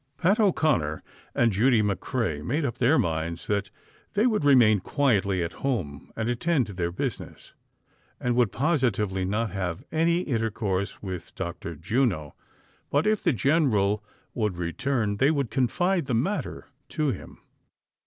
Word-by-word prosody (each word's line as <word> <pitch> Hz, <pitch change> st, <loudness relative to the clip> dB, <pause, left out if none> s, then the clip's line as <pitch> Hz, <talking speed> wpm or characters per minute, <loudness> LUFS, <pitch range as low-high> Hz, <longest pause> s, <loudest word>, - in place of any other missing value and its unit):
Pat 195 Hz, +6 st, +2 dB
O 205 Hz, -3 st, +5 dB
'Conner 85 Hz, -, 0 dB, 0.3 s
and 120 Hz, -1 st, +3 dB
Judy 110 Hz, +3 st, +3 dB
McCrea 100 Hz, -, -1 dB
made 145 Hz, -, -1 dB
up 120 Hz, -, -3 dB
their 130 Hz, +6 st, +4 dB
minds 80 Hz, 0 st, -1 dB
that 100 Hz, -2 st, -1 dB, 0.4 s
they 210 Hz, +3 st, +2 dB
would 220 Hz, -8 st, +2 dB
remain 120 Hz, -7 st, +6 dB
quietly 100 Hz, -, +1 dB
at 85 Hz, -, -4 dB
home 90 Hz, -, -3 dB
and 110 Hz, 0 st, -2 dB
attend 130 Hz, +3 st, +1 dB
to 100 Hz, -, -8 dB
their 85 Hz, -2 st, -2 dB
business, 85 Hz, -, -5 dB, 0.7 s
and 125 Hz, -1 st, 0 dB
would 120 Hz, -5 st, +3 dB
positively 110 Hz, -, 0 dB
not 105 Hz, +2 st, -1 dB
have 90 Hz, -3 st, -3 dB
any 170 Hz, +3 st, +1 dB
inter 115 Hz, -5 st, 0 dB
course 100 Hz, -2 st, -3 dB
with 90 Hz, -3 st, -6 dB
Dr. 85 Hz, -1 st, -5 dB
Juno; 90 Hz, -, 0 dB, 0.6 s
but, 145 Hz, +2 st, +2 dB
if 215 Hz, -1 st, +2 dB
the 170 Hz, -, +3 dB
general 110 Hz, -, +2 dB, 0.3 s
would 105 Hz, -6 st, -1 dB
return, 105 Hz, +5 st, -1 dB
they 135 Hz, +6 st, +4 dB
would 140 Hz, -7 st, 0 dB
confide 170 Hz, -, +1 dB
the 125 Hz, -, 0 dB
matter 190 Hz, -, -2 dB, 0.2 s
to 155 Hz, -2 st, 0 dB
him. 95 Hz, -, -8 dB
115 Hz, 155 wpm, -26 LUFS, 95-140 Hz, 0.7 s, remain